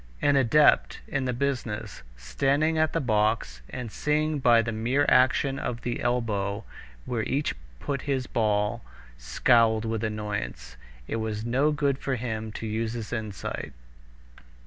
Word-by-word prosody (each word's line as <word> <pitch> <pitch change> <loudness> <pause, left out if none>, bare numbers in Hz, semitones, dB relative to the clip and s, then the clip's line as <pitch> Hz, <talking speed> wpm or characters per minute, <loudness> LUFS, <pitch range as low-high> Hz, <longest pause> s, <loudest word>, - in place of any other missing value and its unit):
An 145 - +3
adept 135 +3 +4
in 135 -4 -1
the 125 - 0
business, 125 -4 -3 0.2
standing 135 - +1
at 155 -1 +2
the - - 0
box 105 - 0
and 125 -4 -6
seeing 150 +2 0
by 120 -3 +5
the 115 - -2
mere 120 +6 +1
action 130 +2 +3
of 120 -1 -4
the 120 -1 -2
elbow 110 -4 -1 0.4
where 120 -2 -1
each 140 +6 -1 0.3
put 140 - -3
his 135 -3 -1
ball, 105 0 0 0.4
scowled 110 - +3
with 115 -1 -2
annoyance. 80 - -4 0.3
It - - -2
was 110 -1 -3
no 135 +6 +2
good 140 -2 0
for 135 - -1
him 110 -2 -4
to 115 - -6
use 110 +1 -2
his 115 -1 -5
insight. 110 -4 -4
115 Hz, 145 wpm, -27 LUFS, 110-135 Hz, 0.4 s, by